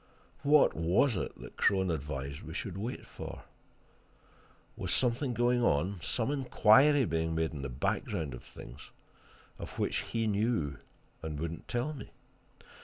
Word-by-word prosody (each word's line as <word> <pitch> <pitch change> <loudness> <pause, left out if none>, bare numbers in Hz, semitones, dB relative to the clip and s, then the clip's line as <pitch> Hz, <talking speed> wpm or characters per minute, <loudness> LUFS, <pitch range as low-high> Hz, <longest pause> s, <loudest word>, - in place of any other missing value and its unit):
What 150 +1 +5
was 90 - +3
it 90 - -4
that - - -11
Crone 95 -2 +3
advised 70 -2 -4
we - - -8
should - - -4
wait 110 +6 -4
for? - - -8 1.3
Was - - -3
something 125 +2 +2
going 120 +1 +3
on, 90 +2 +1
some 115 - 0
inquiry 135 +1 +5
being 80 -2 -1
made 80 0 0
in 75 - -6
the 70 - -4
background 70 +3 -2
of 60 - -8
things, 65 +4 -11 0.7
of - - -8
which - - 0
he 115 -1 -2
knew 105 - 0 0.4
and 75 -2 -4
would 80 +1 -2
not 85 - -9
tell 120 +6 -1
me? 140 - -9
95 Hz, 150 wpm, -31 LUFS, 80-120 Hz, 1.3 s, What